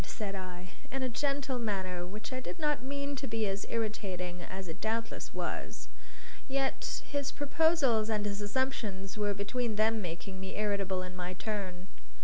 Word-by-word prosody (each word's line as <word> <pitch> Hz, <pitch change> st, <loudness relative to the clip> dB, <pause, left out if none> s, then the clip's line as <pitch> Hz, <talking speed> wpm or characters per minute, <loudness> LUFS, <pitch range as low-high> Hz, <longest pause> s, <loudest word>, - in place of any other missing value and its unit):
said 205 Hz, -2 st, -2 dB
I, 185 Hz, -1 st, -5 dB, 0.2 s
in 270 Hz, 0 st, 0 dB
a 255 Hz, -, +2 dB
gentle 275 Hz, 0 st, +1 dB
manner 185 Hz, -5 st, 0 dB
which 210 Hz, +6 st, -5 dB
I 255 Hz, -, 0 dB
did 260 Hz, -, -4 dB
not 300 Hz, -4 st, +2 dB
mean 280 Hz, +2 st, -1 dB
to 270 Hz, -, -2 dB
be 225 Hz, -1 st, +2 dB
as 195 Hz, +1 st, -1 dB
irritating 190 Hz, -6 st, -1 dB
as 190 Hz, +1 st, -5 dB
it 160 Hz, -, -5 dB
doubtless 225 Hz, +1 st, -1 dB
was. -, -, -3 dB, 0.6 s
Yet 270 Hz, 0 st, +1 dB
his 285 Hz, -1 st, 0 dB
proposals 285 Hz, -7 st, +4 dB
and 210 Hz, -2 st, +2 dB
his 205 Hz, 0 st, 0 dB
assumptions 205 Hz, -4 st, 0 dB
were 205 Hz, -1 st, +2 dB
between 220 Hz, +3 st, 0 dB
them 220 Hz, +1 st, +4 dB
making 185 Hz, +2 st, -4 dB
me 190 Hz, 0 st, -4 dB
irritable 200 Hz, -3 st, +1 dB
in 185 Hz, 0 st, -6 dB
my 180 Hz, 0 st, -2 dB
turn. 185 Hz, -2 st, -2 dB
210 Hz, 165 wpm, -34 LUFS, 190-260 Hz, 0.6 s, proposals